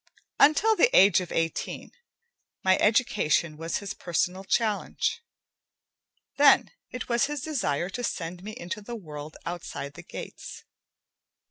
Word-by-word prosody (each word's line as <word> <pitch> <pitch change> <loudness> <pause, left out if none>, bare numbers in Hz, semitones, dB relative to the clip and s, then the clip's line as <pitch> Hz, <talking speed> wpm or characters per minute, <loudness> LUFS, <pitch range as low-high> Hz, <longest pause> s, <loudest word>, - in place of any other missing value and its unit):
Until 410 +10 +5
the 475 - +5
age 195 -1 +6
of 180 - -7
eighteen, 165 0 -2 0.7
my 190 0 +5
education 205 -8 +2
was 165 +2 -3
his 200 - -5
personal 180 +2 -1
challenge. 215 - 0 1.2
Then, 280 -1 +6 0.2
it 250 - -6
was 235 +2 +2
his 295 -1 -4
desire 175 - -1
to 245 - -5
send 175 -4 -4
me 215 +2 -7
into 175 +4 -5
the 235 +3 -7
world 155 -6 -9
outside 170 -4 -5
the - - -10
gates. - - -9
195 Hz, 130 wpm, -27 LUFS, 165-245 Hz, 1.2 s, age